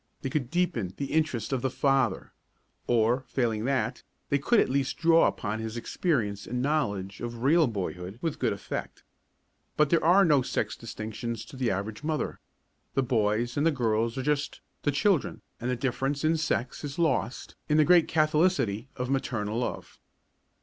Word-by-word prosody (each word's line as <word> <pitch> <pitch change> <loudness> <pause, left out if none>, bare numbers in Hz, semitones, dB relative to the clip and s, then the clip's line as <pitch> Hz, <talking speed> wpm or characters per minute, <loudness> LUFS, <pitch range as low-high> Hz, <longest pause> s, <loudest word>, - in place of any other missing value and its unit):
They 135 - -2
could 130 -5 -1
deepen 130 - -1
the 140 - -4
interest 140 -7 0
of 130 - 0
the 130 - 0
father 135 -5 +1 0.5
or, 120 +2 +2
failing 115 -3 -1
that, 135 -1 0 0.3
they 140 - +2
could 220 - +3
at - - +5
the - - -5
least 135 -1 0
draw 165 0 +5
upon 105 +1 -3
his 110 +1 -4
experience 115 - -1
and 125 +1 -2
knowledge 105 -9 -1
of 120 0 -5
real 160 +3 +5
boyhood 95 -2 -4
with 165 +1 -3
good - - +1
effect. - - -5 0.7
But 150 -1 +3
there 170 - +3
are 185 +5 +6
no 150 -5 +4
sex 110 -4 -2
distinctions 110 0 -5
to 125 - -12
the 130 -2 0
average 105 +6 -3
mother. 155 -1 -2 0.6
The 135 - +3
boys 115 0 0
and 145 - +2
the 165 - +5
girls 115 -3 0
are 130 - -2
just 145 0 -1 0.2
"the 145 - +1
children" 175 +2 +1 0.2
and 120 - -3
the 125 - +1
difference 135 +3 -1
of 160 +1 +2
sex 130 -5 -2
is 140 -2 -5
lost 140 -7 -1
in 150 - +3
the 155 - +5
great 175 -1 +5
catholicity 155 - +1
of 125 0 -3
maternal 120 -5 -1
love. 125 - -5
130 Hz, 175 wpm, -28 LUFS, 115-150 Hz, 0.7 s, are